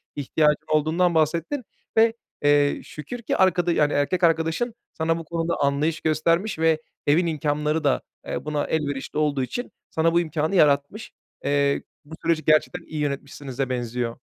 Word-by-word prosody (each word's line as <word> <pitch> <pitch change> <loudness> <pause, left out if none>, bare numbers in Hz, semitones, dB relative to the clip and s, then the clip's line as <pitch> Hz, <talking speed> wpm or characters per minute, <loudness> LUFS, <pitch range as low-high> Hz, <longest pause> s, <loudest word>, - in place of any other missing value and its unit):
ihtiyacın 150 +1 +1
olduğundan 160 +3 +2
bahsettin. 165 - 0 0.3
Ve, 225 0 +5 0.3
eee, 145 0 +3
şükür 235 +11 -8
ki - - -1
arkada 180 -2 +3
yani 150 -2 +2
erkek 175 +6 0
arkadaşın 165 +8 +2 0.2
sana 165 +1 0
bu 165 - -7
konuda 165 +1 -2
anlayış 145 +3 +1
göstermiş 165 +5 +1
ve 160 -1 +3 0.3
evin 165 +5 +4
imkânları 150 0 0
da, 140 - +2 0.3
eee, - - -4
buna 150 -1 -1
elverişli 145 -3 -2
olduğu 145 -3 +1
için 245 - -5 0.2
sana 165 +1 +1
bu 170 - +5
imkânı 155 +2 -1
yaratmış. 145 +6 +2 0.3
Eee, 140 0 +2 0.2
bu 160 +2 -9
süreci 165 -2 +1
gerçekten 155 +3 +2
iyi 155 - -6
yönetmişsinize 140 -2 -3
benziyor. 120 -1 -2
155 Hz, 150 wpm, -24 LUFS, 145-165 Hz, 0.3 s, Ve